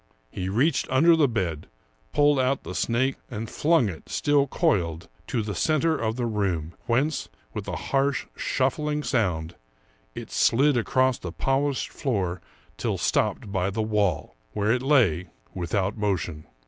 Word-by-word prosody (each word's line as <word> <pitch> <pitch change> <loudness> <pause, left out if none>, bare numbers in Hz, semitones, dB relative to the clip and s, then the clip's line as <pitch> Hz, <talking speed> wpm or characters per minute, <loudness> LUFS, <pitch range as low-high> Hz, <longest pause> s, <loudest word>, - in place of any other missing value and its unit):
" - - -40
He 95 0 -3
reached 130 +8 +1
under 160 +6 +5
the 155 -3 +4
bed, 90 - -2 0.4
pulled 145 -1 +4
out 130 +1 +1
the - - -6
snake, 130 +3 0
and 115 -1 -5
flung 155 0 +2
it, 85 -6 -8
still 145 -1 +2
coiled, 95 - 0 0.2
to 115 -4 -1
the 105 -1 -4
center 155 - +2
of 115 -4 -1
the 120 -1 -1
room, 95 -8 -1
whence, 135 +6 0 0.2
with - - -5
a - - -3
harsh, 135 0 0
shuffling 150 +3 0
sound, 90 - 0 0.6
it - - -7
slid 140 +4 +3
across 130 +2 +2
the 90 - -6
polished 135 - 0
floor 95 -9 -2 0.4
till - - -1
stopped 100 - 0
by 95 -1 0
the 110 +3 -2
wall, 105 - 0 0.2
where 105 +1 +1
it 125 +1 +1
lay 115 - +3 0.2
without 95 +3 -1
motion. 90 -7 -2
115 Hz, 155 wpm, -25 LUFS, 95-140 Hz, 0.6 s, under